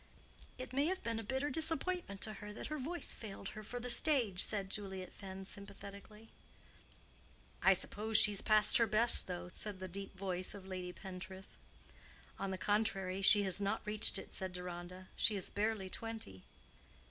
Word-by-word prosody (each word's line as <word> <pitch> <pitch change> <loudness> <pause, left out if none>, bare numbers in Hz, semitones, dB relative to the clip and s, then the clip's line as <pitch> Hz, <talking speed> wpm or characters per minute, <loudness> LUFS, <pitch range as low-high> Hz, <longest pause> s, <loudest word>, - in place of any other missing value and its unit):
"It 255 0 -7
may 280 +3 +2
have 375 +2 -2
been 230 -1 -2
a - - -5
bitter 265 +6 -1
disappointment 320 - -1
to 215 - -2
her 210 0 -7
that - - -7
her 305 - -3
voice 330 +6 -3
failed 200 -3 -7
her 215 - -8
for 245 +4 -6
the 245 - -5
stage," 240 - +3
said 195 -2 +2
Juliet 190 -3 -5
Fenn, 190 -1 -8
sympathetically. 200 +2 -9 1.3
"I - - +7
suppose 215 +1 0
she's 205 -2 +5
past 215 -1 +6
her 230 - +4
best, 220 +3 +7
though," 180 -1 -5
said 210 -2 -3
the 185 0 -6
deep 195 +2 -8
voice 185 -1 -1
of 195 -2 -10
Lady 185 -1 -5
Pentreath. 190 0 -9 0.8
"On 195 - -2
the 190 - -3
contrary, 195 -2 0
she 205 +1 +7
has 190 +1 +2
not 200 0 -1
reached 210 +1 +1
it," - - -8
said 185 -1 -3
Deronda. 180 +1 -7
"She 215 - +2
is 190 - -1
barely 210 -1 -1
twenty." 220 - -5
200 Hz, 170 wpm, -36 LUFS, 190-225 Hz, 1.3 s, I